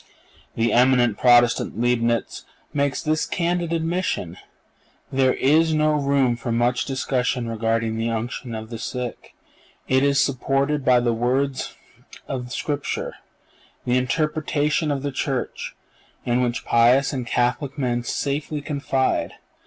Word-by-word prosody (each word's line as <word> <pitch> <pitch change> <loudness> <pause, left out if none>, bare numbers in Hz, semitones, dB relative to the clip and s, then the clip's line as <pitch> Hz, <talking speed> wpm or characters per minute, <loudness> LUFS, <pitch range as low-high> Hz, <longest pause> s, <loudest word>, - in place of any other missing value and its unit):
The 115 +1 +1
eminent 125 -3 +4
Protestant 120 -2 +4
Leibnitz 120 -1 0 0.3
makes 140 -2 0
this 155 0 0
candid 175 -1 -1
admission: 165 - -1 0.8
"There 130 -1 +2
is 155 +4 +3
no 155 0 +3
room 140 -4 +2
for 120 0 -5
much 120 +2 +1
discussion 130 -2 -1
regarding 115 0 -1
the 115 +1 -1
unction 115 +1 -4
of 110 +1 -7
the 115 - -5
sick. 125 -1 -6 0.5
It 130 0 +3
is 140 0 +3
supported 140 +2 +1
by 125 -1 +4
the 120 -1 +1
words 130 +4 -1 0.5
of 125 -2 -5
Scripture, 145 +1 -3 0.7
the 125 - +1
interpretation 150 +3 0
of 140 -2 -2
the 145 - -2
Church, 135 -1 -3 0.5
in 120 +1 +1
which 120 -1 -1
pious 125 +4 +4
and 125 -3 -3
Catholic 130 +4 0
men 120 -3 -1
safely 145 +4 -2
confide. 140 -2 -1
130 Hz, 130 wpm, -23 LUFS, 120-145 Hz, 0.8 s, eminent